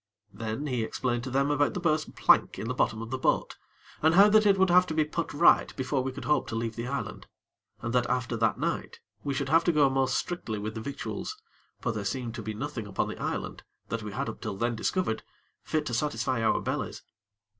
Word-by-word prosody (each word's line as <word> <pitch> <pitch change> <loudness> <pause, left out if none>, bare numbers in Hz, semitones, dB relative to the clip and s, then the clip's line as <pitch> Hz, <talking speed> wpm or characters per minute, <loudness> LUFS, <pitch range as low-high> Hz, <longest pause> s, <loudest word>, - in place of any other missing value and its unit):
Then, 115 +5 -4
he 125 -5 -1
explained 120 +1 -1
to - - -4
them 140 +2 +1
about 145 0 +2
the - - -1
burst 155 -3 0
plank - - +4
in 110 - -4
the 125 - -1
bottom 115 -3 0
of 115 - -8
the 130 - -2
boat, - - +1 0.4
and 160 +2 +4
how 200 +3 +8
that 215 0 +5
it 195 -1 +5
would 190 -1 +4
have 180 +1 +6
to 160 - -3
be 155 -1 +3
put 165 +2 -3
right 145 - +5
before 130 +1 0
we 130 +1 -2
could 130 - -8
hope 150 - +2
to - - -4
leave 115 0 -2
the 115 +1 -4
island, 140 - -4 0.6
and 115 - -2
that 125 -1 +2
after 125 -2 0
that 115 -1 +1
night - - -3 0.2
we 140 -1 -2
should - - -2
have 165 +1 +5
to 175 - +4
go 145 -4 +4
most 135 -1 +1
strictly 145 -11 -3
with 105 +1 -4
the 110 - -5
victuals; 140 - -5 0.4
for 125 - 0
there 110 -3 -4
seemed 115 +3 -3
to 115 - -5
be 110 0 -5
nothing 125 -3 -4
upon 100 - -1
the - - -7
island, - - -3 0.3
that 115 -1 -2
we 105 -1 -6
had - - -3
up - - -6
till 95 - -4
then 120 +2 0
discovered, 110 0 -1 0.4
fit 155 -1 -1
to 120 - -3
satisfy 130 -2 0
our 115 - +3
bellies. - - -3
130 Hz, 235 wpm, -28 LUFS, 115-150 Hz, 0.6 s, how